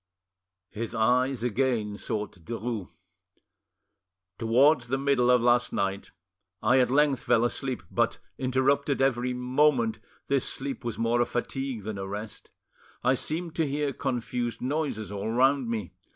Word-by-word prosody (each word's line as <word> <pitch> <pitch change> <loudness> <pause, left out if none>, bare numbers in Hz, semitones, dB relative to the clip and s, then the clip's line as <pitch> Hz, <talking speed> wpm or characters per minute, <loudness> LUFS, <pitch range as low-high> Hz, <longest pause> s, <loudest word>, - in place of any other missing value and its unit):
His 115 +2 -5
eyes 125 +2 +2
again 120 -3 0
sought 105 -4 -4
Derues. 115 -1 -4 1.5
"Towards 125 +3 +4
the 135 +3 0
middle 135 -3 +2
of 125 -2 +5
last 120 0 +3
night 100 0 -2 0.5
I 120 +4 +4
at 125 - +3
length 140 0 +3
fell 120 -1 +3
asleep, 130 +1 -2
but, - - +1 0.2
interrupted 135 +2 +1
every 125 -2 +1
moment, 125 -3 +2 0.3
this 140 -2 +1
sleep 135 0 -3
was 120 -1 -4
more 115 +1 +2
a - - +3
fatigue 130 -2 -3
than 105 -1 -5
a 95 - -4
rest; 105 +2 -7 0.5
I 130 +1 +4
seemed 160 +5 -2
to 160 -2 +2
hear 145 0 -1
confused 120 -2 -2
noises 130 -6 -2
all 100 +1 -3
round 130 +1 +3
me. 110 -6 -3
125 Hz, 140 wpm, -27 LUFS, 115-135 Hz, 1.5 s, of